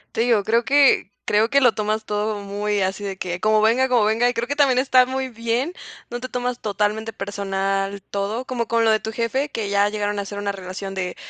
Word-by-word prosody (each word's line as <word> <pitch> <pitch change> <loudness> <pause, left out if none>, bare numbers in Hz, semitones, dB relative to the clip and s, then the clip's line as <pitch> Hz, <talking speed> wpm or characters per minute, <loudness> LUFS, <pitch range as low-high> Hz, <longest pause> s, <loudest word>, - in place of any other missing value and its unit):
Te - - +1
digo, 230 -3 +3
creo 230 +3 +2
que 275 -8 +4
creo 215 +2 +3
que, 280 0 +4
lo 245 -3 +5
tomas 215 +1 -2
todo 210 0 -2
muy 205 +1 -2
así, 190 +2 -2
de 195 -1 -4
que 175 -1 -3
como 215 +2 +3
venga 240 +4 +3
como 245 -4 +3
venga. 225 +3 +2
Y 245 - +1
creo 235 0 -2
que 285 - -2
también, 275 -4 +3
está 255 -1 +5
muy 260 +1 -3
bien. 235 +7 -2 0.4
No 240 - -4
te 255 - -5
tomas, 250 -1 -3
totalmente 210 +2 -1
personal 195 -1 -2
todo, 205 +5 -3
como 240 -3 -3
con 230 0 +2
lo 225 - +4
de 220 0 +3
tu 220 - -5
jefe, 250 +6 -1
que 215 -5 -4
ya 200 0 +3
llegaron 205 -1 -2
a 200 - -1
hacer 200 +1 -7
una 205 0 -1
relación 195 0 -7
de 180 -2 -3
215 Hz, 235 wpm, -22 LUFS, 200-245 Hz, 0.4 s, lo